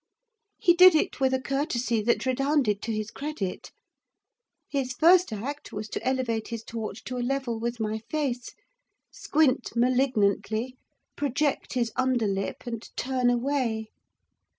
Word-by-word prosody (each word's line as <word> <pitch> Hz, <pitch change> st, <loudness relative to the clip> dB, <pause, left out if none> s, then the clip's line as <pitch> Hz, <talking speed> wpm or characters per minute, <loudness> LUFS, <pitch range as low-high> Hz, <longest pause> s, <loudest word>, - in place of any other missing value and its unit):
He 345 Hz, -, +4 dB
did 365 Hz, 0 st, +8 dB
it 310 Hz, -, 0 dB
with 265 Hz, -1 st, +3 dB
a 260 Hz, -, +1 dB
courtesy 255 Hz, -4 st, -1 dB
that 235 Hz, +4 st, +1 dB
redounded 260 Hz, -5 st, +1 dB
to 230 Hz, -, -3 dB
his 215 Hz, 0 st, -3 dB
credit. 275 Hz, -11 st, -5 dB, 1.0 s
His 265 Hz, -3 st, -2 dB
first 345 Hz, +3 st, +5 dB
act 265 Hz, +8 st, -5 dB
was 210 Hz, +1 st, -5 dB
to -, -, -4 dB
elevate 255 Hz, -4 st, -1 dB
his 230 Hz, -1 st, -5 dB
torch 225 Hz, -2 st, -6 dB
to 255 Hz, -, -5 dB
a -, -, -1 dB
level 245 Hz, -2 st, -1 dB
with 235 Hz, +1 st, -3 dB
my 220 Hz, 0 st, -2 dB
face, 270 Hz, -6 st, -2 dB, 0.6 s
squint 270 Hz, -7 st, +1 dB
malignantly, 245 Hz, -1 st, +1 dB, 0.4 s
project 285 Hz, 0 st, -1 dB
his 240 Hz, -3 st, 0 dB
under 255 Hz, -3 st, +1 dB
lip, 195 Hz, -1 st, -2 dB
and 230 Hz, -2 st, -4 dB, 0.2 s
turn 255 Hz, -1 st, +1 dB
away. 240 Hz, -3 st, 0 dB
250 Hz, 140 wpm, -27 LUFS, 225-275 Hz, 1.0 s, did